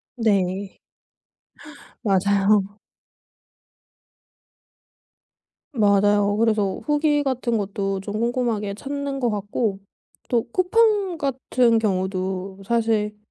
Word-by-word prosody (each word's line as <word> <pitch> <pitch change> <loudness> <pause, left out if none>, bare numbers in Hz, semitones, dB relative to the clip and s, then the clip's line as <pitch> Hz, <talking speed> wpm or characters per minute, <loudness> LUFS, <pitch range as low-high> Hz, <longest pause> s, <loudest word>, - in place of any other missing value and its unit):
네. 195 -4 0 1.2
맞아요. 200 0 +2 2.9
맞아요. 205 -3 +3
그래서 215 -4 +1
후기 295 -1 +2
같은 250 -3 -1
것도 195 -1 -2
좀 210 +2 -4
꼼꼼하게 235 -4 -1
찾는 280 +3 -4
것 245 - +1
같고 205 0 -2 0.5
또 235 -2 +2
쿠팡 395 - +2
같은 255 -4 +1
경우도 190 -1 -2
사실 220 -2 0
215 Hz, 160 characters per minute, -23 LUFS, 200-250 Hz, 2.9 s, 맞아요